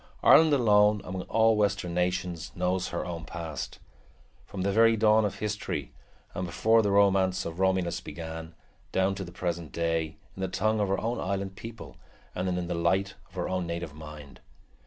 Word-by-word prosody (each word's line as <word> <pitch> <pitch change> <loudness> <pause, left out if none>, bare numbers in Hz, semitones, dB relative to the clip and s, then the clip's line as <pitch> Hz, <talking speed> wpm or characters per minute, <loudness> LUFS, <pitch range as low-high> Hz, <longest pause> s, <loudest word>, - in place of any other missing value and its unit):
Ireland 160 0 +7
alone 105 -5 +4
among 90 0 -5
all 110 0 +4
western 100 -4 0
nations 90 -1 -1
knows 90 +1 0
her 85 - -3
own 85 -1 -5
past, 80 -4 -6 0.7
from 95 -2 -4
the 100 - +1
very 115 +2 +5
dawn 110 0 +4
of 100 - -2
history 105 - -4 0.4
and 90 - -3
before 110 +6 +3
the 105 - 0
romance 95 -2 +3
of 85 +1 -6
Romulus 95 -2 +1
began, 80 -1 -7 0.4
down 95 +1 +2
to 95 0 -5
the 85 - -9
present 85 -3 -3
day, 80 -2 -1 0.2
in 95 - -7
the 95 - 0
tongue 110 +4 0
of 105 - +1
her 95 +1 0
own 115 +2 -2
island 95 0 -3
people 115 +3 -9 0.4
and 90 +1 -2
in 90 -1 -1
the 90 - -2
light 95 +3 +1 0.2
of - - -22
her - - -2
own 90 -2 -2
native 85 -2 -4
mind. 75 -2 -11
95 Hz, 180 wpm, -28 LUFS, 85-105 Hz, 0.7 s, Ireland